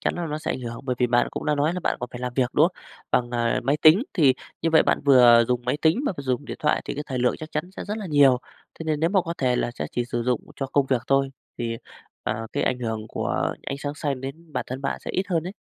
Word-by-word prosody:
chắn - - 0
là 175 -1 -3
nó 150 -1 -3
sẽ - - -3
ảnh - - -3
hưởng, 120 -1 -6
bởi 125 -2 -1
vì 125 - +3
bạn 120 0 +2
cũng - - -5
đã 150 - +2
nói 145 +3 +1
là 180 - -3
bạn - - 0
còn 125 - -4
phải 120 - -7
làm 125 0 -3
việc, 125 -2 +1
đúng 155 - +5
không? - - -23 0.3
Bằng, 120 -1 +1
à, 120 +1 0
máy 140 +4 +2
tính, 160 +8 +7
thì 145 -8 +4 0.3
như 165 - +2
vậy 160 -1 +6
bạn - - +1
vừa 120 -4 +7
dùng 125 -1 0
máy 125 +3 0
tính 160 +6 +4
mà 205 - +1
vừa 140 - -5
dùng 130 +1 -1
điện - - -6
thoại 150 - +1
thì - - -4
cái 150 - -3
thời 130 -2 -3
lượng 125 0 +2
chắc 155 0 -8
chắn 155 +4 -3
sẽ - - -5
rất 210 +1 -3
là 205 - -5
nhiều. 140 -5 +5 0.4
Thế 165 - -6
nên 155 -2 -1
nếu 165 +2 +2
mà 195 -1 +4
có 170 0 -4
thể 125 -2 +2
là - - 0
sẽ 120 - -5
chỉ 120 - -1
sử 120 0 -2
dụng 125 0 0 0.2
cho 135 - -2
công 140 0 +1
việc 130 -4 +1
thôi, 135 0 +2 0.3
thì, 115 -1 -2 0.5
ờ, 110 +1 -3
cái - - 0
ảnh 125 - 0
hưởng 110 -3 -3
của - - -1
ánh 140 - -4
sáng 145 0 -4
xanh 145 -3 -2
đến 150 +5 -8
bản - - -2
thân 130 +2 -5
bạn 140 - -2
sẽ - - -5
ít 190 - -1
hơn 170 -4 +1
ấy. 185 - -6
135 Hz, 300 wpm, -24 LUFS, 125-155 Hz, 0.5 s, tính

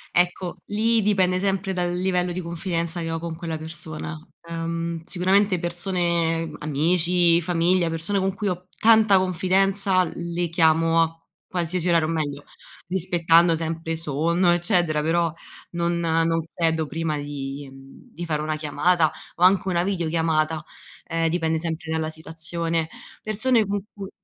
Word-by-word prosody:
Ecco, 180 +1 +1
lì 225 +2 +1
dipende 190 -3 +2
sempre 195 0 -1
dal 175 -1 -1
livello 180 -1 0
di 180 - -3
confidenza 170 0 -3
che 165 - -3
ho 165 - -2
con 165 0 -5
quella 165 -1 -4
persona, 160 0 -7 0.3
uhm, 165 0 -3
sicuramente 190 +2 +2
persone, 170 -2 0
amici, 170 +3 +3
famiglia, 175 +1 +2
persone 165 +5 -1
con 190 0 0
cui 210 0 -3
ho, 180 -1 -3
p - - -28
tanta 220 -3 +6
confidenza, 190 +1 +2
le 170 0 -3
chiamo 165 0 +3
a 165 0 -1 0.3
qualsiasi 180 0 -1
orario, 170 -2 +3
o - - -2
meglio, 145 -3 -3 0.5
rispettando 170 -2 +4
sempre 165 0 -3
sonno 165 +4 +1
eccetera, 175 -3 +2
però 165 +1 +1 0.4
non 170 0 -1
non 165 0 +1
chiedo 160 -2 +1
prima 160 0 -2
di 145 -1 -6
di 135 - -12
fare 150 -2 -1
una 155 0 -1
chiamata 155 +2 +2 0.2
o 175 - -1
anche 190 +1 +4
una 175 -2 +1
videochiamata, 160 -4 0 0.4
ehm, 165 0 0
dipende 160 -1 0
sempre 160 0 -4
dalla 160 0 -1
situazione, 165 +1 -3 0.4
persone 220 +2 +2
con 200 0 -2
cui 195 -1 -8
170 Hz, 145 wpm, -23 LUFS, 160-180 Hz, 0.5 s, tanta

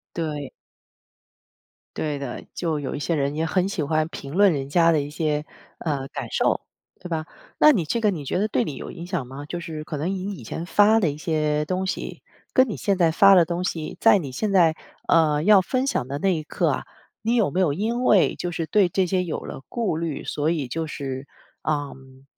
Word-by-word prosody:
对。 150 -4 -3 1.5
对 150 -2 -2
的， 135 -3 -6
就 160 -4 -1
有 140 - -4
一 - - -3
些 165 +3 -1
人 140 -1 0
也 160 - -1
很 185 +3 +1
喜 200 -5 -2
欢 155 +1 +1
评 140 -4 -8
论 200 -1 +5
人 140 -2 -3
家 165 +2 +4
的 155 - +2
一 145 +1 -5
些， 150 -1 -1 0.3
呃 140 -4 -2
感 - - -6
受， - - +1 0.4
对 - - -8
吧？ 160 -2 -2 0.3
那 305 - +7
你 185 - 0
这 230 +10 -1
个 215 -2 +3
你 155 -7 -5
觉 160 - -1
得 205 - +2
对 - - +1
你 145 -4 -5
有 - - -7
影 170 -1 -8
响 180 -8 -3
吗？ 135 +3 -8
就 175 - -4
是 160 -2 -6
可 155 - -5
能 155 +6 -2
你 195 +1 -3
以 130 - -10
前 160 - -5
发 210 +3 +5
的 170 -8 +2
一 145 - -6
些 150 -2 0
东 185 +3 -2
西， - - -4 0.3
跟 260 -1 +4
你 210 - -4
现 200 -1 0
在 170 -3 +3
发 195 +4 +7
的 175 - +6
东 175 +2 -3
西， 160 -4 -3
在 225 -3 +6
你 140 -7 -5
现 205 +10 -2
在， 170 -4 +4 0.3
呃 155 -2 +4
要 205 +1 +7
分 255 +7 -1
享 130 - 0
的 140 +2 -4
那 190 +2 +2
一 155 - -3
刻 - - -1
啊， - - -2 0.4
你 230 +2 +1
有 220 -9 +3
没 180 +6 0
有 160 -6 +3
因 230 - -1
为 200 -6 +4
就 175 - -3
是 165 -1 -3
对 200 -1 +3
这 185 +1 +1
些 180 0 0
有 165 - -3
了 135 - -8
顾 225 -9 -1
虑， 160 -3 -3
所 150 +1 -1
以 150 -7 -1
就 160 +4 -3
是， 135 -2 -5 0.4
嗯 135 -3 -4
165 Hz, 245 characters per minute, -24 LUFS, 150-190 Hz, 1.5 s, 那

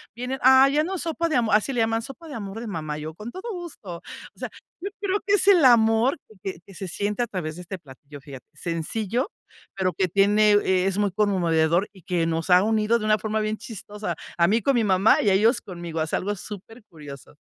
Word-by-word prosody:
vienen, 250 +3 -4
ah, 265 +1 +7
ya 295 +2 +2
no 375 +4 -3
sopa 335 0 -2
de 315 - 0
amor, 225 -3 +3
así 215 +6 +1
le 240 - +1
llaman, 225 0 +1
sopa 300 +7 -10
de 300 - -8
amor 205 0 -6
de 235 - -6
mamá. 155 -6 -4
Yo, 155 +1 -6
con 215 +6 -8
todo 415 - -6
gusto. 335 - -7 0.4
O - - -23
sea, - - -4 0.3
yo 395 - -3
creo 400 0 0
que 405 +1 +4
es 400 - 0
el 370 -6 +6
amor 230 +1 +4
que 215 - -19 0.2
que - - -17
que 195 - -14
se 190 - -6
siente 205 +5 -2
a - - -3
través 170 -7 -4
de - - -7
este 190 +2 -6
platillo, 145 0 -13
fíjate, 135 -2 -11
sencillo, 200 - -3 0.4
pero 185 -2 0
que 185 +3 0
tiene 205 +3 +4 0.3
es 195 0 0
muy 205 -1 +1
conmovedor 175 -3 +2
y 190 - -16
que 175 -2 0
nos 165 +1 -2
ha 180 +1 +6
unido 220 +1 +2
de 215 - -4
una 215 0 +3
forma 220 0 -2
bien 215 0 -1
chistosa. 210 -4 -6 0.2
A 170 -1 +4
mí 220 +5 +2
con 275 - +2
mi 235 - +2
mamá 195 +1 +4
y 205 - +2
a - - +4
ellos 225 +5 +3
conmigo. 170 -3 -6
Es 155 - -3
algo 205 +2 -1
super 210 +4 -10
curioso. 145 -4 -12
210 Hz, 235 wpm, -24 LUFS, 175-235 Hz, 0.4 s, ah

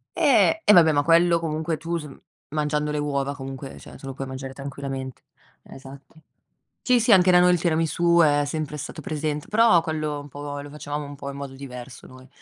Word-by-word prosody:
Eh, 325 - +3
e 210 - +6
vabbè 165 -3 +7
ma 145 - +2
quello 170 +1 +4
comunque 160 0 -2
tu 170 +2 -3
s 150 -3 -7 0.4
mangiando 150 0 -1
le 150 - -2
uova 140 -1 -2
comunque, 135 0 -8
cioè - - -13
te - - -13
lo 135 - -5
puoi 135 0 -6
mangiare 130 0 -7
tranquillamente 135 -1 -7 0.4
Esatto. 135 +2 -13 0.7
Sì, 250 -1 +3
sì, 235 0 +2
anche 185 -2 +6
da 180 - +6
noi 180 0 +5
il 175 - +1
tiramisù 170 +1 +2
è 145 -1 +3
sempre 150 0 -4
stato 155 +2 -7
presente, 150 0 -3
però 215 -6 +4
quello 155 -3 -3
un 145 - -10
po' 145 +1 -7
lo 145 - -10
facevamo 145 0 -5
un 145 - -9
po' 140 0 -7
in 140 - -7
modo 140 -1 -7
diverso, 125 -2 -10
noi 130 0 -15
150 Hz, 205 wpm, -24 LUFS, 140-165 Hz, 0.7 s, vabbè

